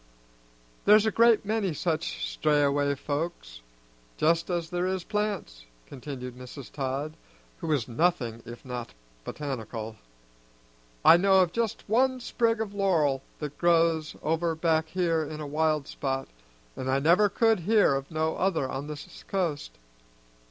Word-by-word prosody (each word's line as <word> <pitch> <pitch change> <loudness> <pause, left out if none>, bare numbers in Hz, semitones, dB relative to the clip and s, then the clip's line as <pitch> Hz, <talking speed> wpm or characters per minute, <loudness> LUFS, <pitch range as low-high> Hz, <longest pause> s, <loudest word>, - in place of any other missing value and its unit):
"There's 210 +1 +7
a 220 - +2
great 230 -2 +4
many 205 -5 -1
such - - -2
strayaway 145 - +2
folks, 145 - -4 0.6
just 165 +3 +2
as 170 -1 -2
there 180 +1 0
is 185 -1 -2
plants," 200 - -3 0.2
continued 125 - -7
Mrs. 125 +1 -10
Todd, 140 +2 -3 0.4
who 170 - -5
was 145 -8 0
nothing 120 -4 0
if 120 +3 -11
not 125 - -6 0.3
botanical. 115 - -5 1.1
"I 170 - +9
know 190 +1 +5
of 175 -2 +1
just 230 0 -2
one 255 +4 +2
sprig 230 -2 0
of 215 -2 -3
laurel 165 -9 +2 0.2
that 150 -1 -7
grows 165 -2 +2
over 165 +1 0
back 160 -1 +1
here 165 -2 +1
in 155 0 -6
a 150 - -5
wild 155 0 0
spot, 135 -1 -3 0.5
an' 130 - -4
I 135 - +3
never 175 +9 +4
could 225 +1 +3
hear 205 -2 +3
of 135 0 -3
no 160 0 -1
other 180 -8 +1
on 135 +2 -5
this 150 -1 -9
coast. 155 - -2
160 Hz, 145 wpm, -27 LUFS, 135-185 Hz, 1.1 s, I